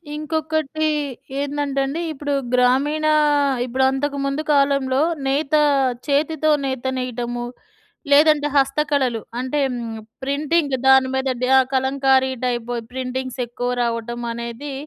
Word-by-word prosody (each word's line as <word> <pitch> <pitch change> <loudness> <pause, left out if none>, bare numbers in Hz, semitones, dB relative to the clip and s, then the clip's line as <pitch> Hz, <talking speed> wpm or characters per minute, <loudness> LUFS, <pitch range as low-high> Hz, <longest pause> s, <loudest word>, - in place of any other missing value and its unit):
ఇంకొకటి 315 0 -2 0.5
ఏందంటే 285 -1 -1
అండి 290 +5 -3
ఇప్పుడు 290 0 -3 0.2
గ్రామీణ 270 +5 +2 0.6
ఇప్పుడంతకు 265 +3 0
ముందు 275 +2 -1
కాలంలో 275 -1 +2 0.3
నేత 285 +2 -1 0.5
చేతితో 310 +2 +1 0.2
నేత 265 -2 -3
నేయడము, 240 -1 -3 0.7
లేదంటే 295 0 +5
హస్తకళలు. 275 -4 +1 0.2
అంటే 260 +3 -2 0.6
ప్రింటింగ్ 285 +1 0
దాని 265 -1 +6
మీద 265 0 -1 0.2
డ - - +3 0.3
కలంకారీ 265 0 +2
టైప్ 240 -1 -2 0.2
ప్రింటింగ్సెక్కువ 250 -1 -4
రావటమనేది 235 +3 -4
270 Hz, 95 wpm, -21 LUFS, 250-290 Hz, 0.7 s, దాని